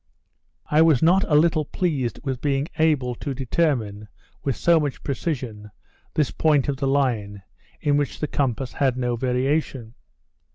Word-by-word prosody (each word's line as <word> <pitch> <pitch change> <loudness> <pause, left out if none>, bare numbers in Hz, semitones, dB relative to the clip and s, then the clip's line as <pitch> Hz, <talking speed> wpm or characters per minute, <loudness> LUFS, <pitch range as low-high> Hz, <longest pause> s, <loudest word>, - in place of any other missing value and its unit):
I 150 +1 +3
was 160 -5 +4
not 185 +4 +5
a 150 - +1
little 155 0 +3
pleased 140 -8 -2
with 130 -4 -3
being 140 0 0
able 145 -6 +2
to 135 +2 -5
determine, 120 -6 -1 0.4
with 135 -3 -1
so 170 -1 +3
much 145 -3 -3
precision, 125 -8 -4 0.5
this 150 -3 +1
point 150 -4 +2
of 140 -2 -1
the 135 0 -1
Line, 115 -8 0 0.4
in 145 -2 +2
which 145 -2 -2
the - - -1
compass 130 -3 -2
has 135 -3 +1
no 125 -1 -1
variation. 130 -1 -1
135 Hz, 155 wpm, -23 LUFS, 125-150 Hz, 0.5 s, not